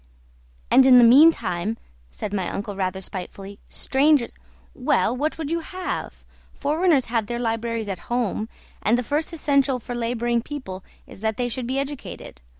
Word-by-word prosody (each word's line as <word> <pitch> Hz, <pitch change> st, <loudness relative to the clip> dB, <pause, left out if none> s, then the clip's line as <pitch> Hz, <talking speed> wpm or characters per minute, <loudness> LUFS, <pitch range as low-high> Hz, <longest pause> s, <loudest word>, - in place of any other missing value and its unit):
"And 265 Hz, 0 st, +7 dB
in 255 Hz, -1 st, +8 dB
the 245 Hz, -, +8 dB
meantime," 230 Hz, -, +5 dB, 0.3 s
said 195 Hz, -, -6 dB
my 190 Hz, -3 st, -1 dB
uncle 205 Hz, 0 st, -5 dB
rather 190 Hz, 0 st, -2 dB
spitefully, 195 Hz, +2 st, -8 dB
"strangers 275 Hz, -2 st, +2 dB, 0.3 s
" -, -, -31 dB, 0.2 s
"Well, -, -, +3 dB
what 300 Hz, +5 st, -1 dB
would 315 Hz, -2 st, -4 dB
you 335 Hz, -, +1 dB
have? 365 Hz, +2 st, -5 dB, 0.3 s
Foreigners 300 Hz, -1 st, +2 dB
have 225 Hz, -3 st, -1 dB
their 240 Hz, -, -3 dB
libraries 230 Hz, -1 st, -2 dB
at 190 Hz, -3 st, -4 dB
home, 230 Hz, -2 st, -1 dB, 0.3 s
and 225 Hz, +3 st, +3 dB
the 250 Hz, -, -1 dB
first 295 Hz, +7 st, -1 dB
essential 280 Hz, -4 st, +1 dB
for 245 Hz, 0 st, -7 dB
labouring 235 Hz, 0 st, 0 dB
people 225 Hz, -9 st, -7 dB, 0.2 s
is -, -, -14 dB
that 220 Hz, -1 st, -1 dB
they 245 Hz, -, 0 dB
should 245 Hz, 0 st, -4 dB
be 260 Hz, +2 st, -1 dB
educated. 275 Hz, 0 st, -6 dB
240 Hz, 165 wpm, -23 LUFS, 210-280 Hz, 0.3 s, in